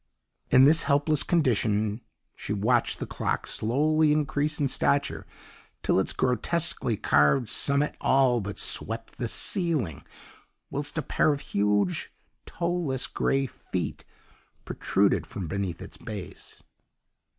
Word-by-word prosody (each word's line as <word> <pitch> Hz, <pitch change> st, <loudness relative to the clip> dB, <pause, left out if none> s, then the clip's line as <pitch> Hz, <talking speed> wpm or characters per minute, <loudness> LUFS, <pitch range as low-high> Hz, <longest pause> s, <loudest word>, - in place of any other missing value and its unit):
"In 130 Hz, -, +6 dB
this 155 Hz, +4 st, +6 dB
helpless 145 Hz, +1 st, +2 dB
condition 110 Hz, -, +1 dB, 0.3 s
she 100 Hz, -, -5 dB
watched 115 Hz, +4 st, +1 dB
the -, -, -4 dB
clock -, -, -2 dB
slowly 150 Hz, +7 st, +1 dB
increase 150 Hz, 0 st, 0 dB
in 145 Hz, -, +2 dB
stature 70 Hz, -, 0 dB, 0.6 s
till -, -, +2 dB
its 95 Hz, -, 0 dB
grotesquely 130 Hz, 0 st, 0 dB
carved 85 Hz, -, +2 dB
summit 140 Hz, +1 st, +2 dB
all 130 Hz, -3 st, +3 dB
but 100 Hz, -1 st, -6 dB
swept 115 Hz, +1 st, -2 dB
the 120 Hz, -, -1 dB
ceiling, 140 Hz, -, -1 dB, 0.7 s
whilst 145 Hz, +2 st, -3 dB
a 160 Hz, -, 0 dB
pair 155 Hz, -, +2 dB
of 145 Hz, -1 st, -3 dB
huge, 100 Hz, -2 st, 0 dB, 0.4 s
toeless, 170 Hz, -7 st, -2 dB
grey 135 Hz, 0 st, 0 dB
feet 130 Hz, -, -5 dB, 0.6 s
protruded -, -, +1 dB
from 95 Hz, -4 st, -6 dB
beneath 95 Hz, -1 st, -4 dB
its -, -, -11 dB
base. 100 Hz, -3 st, -9 dB
130 Hz, 120 wpm, -27 LUFS, 105-150 Hz, 0.7 s, In